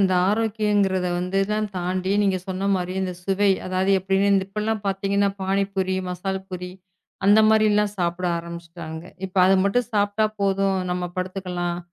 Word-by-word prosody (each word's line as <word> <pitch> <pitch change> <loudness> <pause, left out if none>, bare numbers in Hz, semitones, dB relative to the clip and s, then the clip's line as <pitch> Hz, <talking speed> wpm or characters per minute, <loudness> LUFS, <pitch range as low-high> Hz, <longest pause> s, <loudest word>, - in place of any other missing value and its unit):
இந்த 190 -1 +3 0.2
ஆரோக்கியங்கிறதை 205 -4 +1
வந்து 180 +2 -2
எல்லாம் 210 +1 -1
தாண்டி 185 +1 -2
நீங்கச் 190 -2 0
சொன்ன 190 +1 -2
மாரி 180 0 -2
இந்தச் 180 -2 -4
சுவை. 195 +1 +2 0.2
அதாவது 185 +1 0
எப்படின்னு 195 +1 +2
இப்ப 210 +2 -5
எல்லாம் 220 -1 -1
பாத்தீங்கன்னா 195 +1 +1
பானிபூரி, 195 -1 0
மசாலாபூரிஅந்த 190 +2 -1
மாதிரி 220 0 +4
எல்லாம் 210 0 +2
சாப்பிட 175 +1 -1
ஆரம்பிச்சிட்டாங்க. 170 -1 -8 0.2
இப்ப 190 +1 -17
அதை 195 - +5
மட்டும் 235 +4 +1
சாப்பிட்டா 205 +1 +2
போதும். 195 -1 +1
நம்ம 180 -1 -2
படுத்துக்கலாம். 180 -2 -3
190 Hz, 140 wpm, -23 LUFS, 180-200 Hz, 0.2 s, அதை